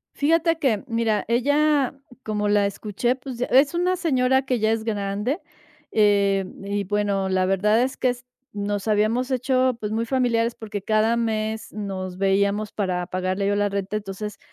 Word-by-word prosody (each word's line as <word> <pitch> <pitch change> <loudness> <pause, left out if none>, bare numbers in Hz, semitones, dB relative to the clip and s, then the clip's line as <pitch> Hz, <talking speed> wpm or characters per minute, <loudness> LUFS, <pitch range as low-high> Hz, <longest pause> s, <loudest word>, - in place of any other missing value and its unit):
Fíjate 330 +2 +2
que, 240 -9 +1
mira, 225 -2 0
ella, 285 +3 +2 0.3
como 210 -1 -1
la 205 -1 +3
escuché, 210 +4 -1
pues 255 -2 -8
es 275 +5 +4
una 360 +1 +1
señora 265 -6 +2
que 255 -2 -1
ya 220 +1 +2
es 225 -1 -2
grande, 210 - -2 0.5
em, 200 -2 +2
y 200 0 -2
bueno, 200 -1 0
la 185 0 +1
verdad 210 +4 +2
es 260 +1 -1
que 255 - +1
es 245 0 -7 0.3
nos 205 0 -3
habíamos 220 +5 +1
hecho, 255 -1 +1
pues, 210 -1 -4
muy 230 +1 -1
familiares 235 -2 +1
porque 210 -3 -6
cada 220 +2 +2
mes 220 -1 -2
nos 190 -3 -5
veíamos 200 +2 +1
para 180 -3 -2
pagarle 185 +2 -2
yo 205 - +2
la 205 0 +1
renta. 200 +1 -3
Entonces, 210 0 -6
215 Hz, 165 wpm, -23 LUFS, 200-250 Hz, 0.5 s, es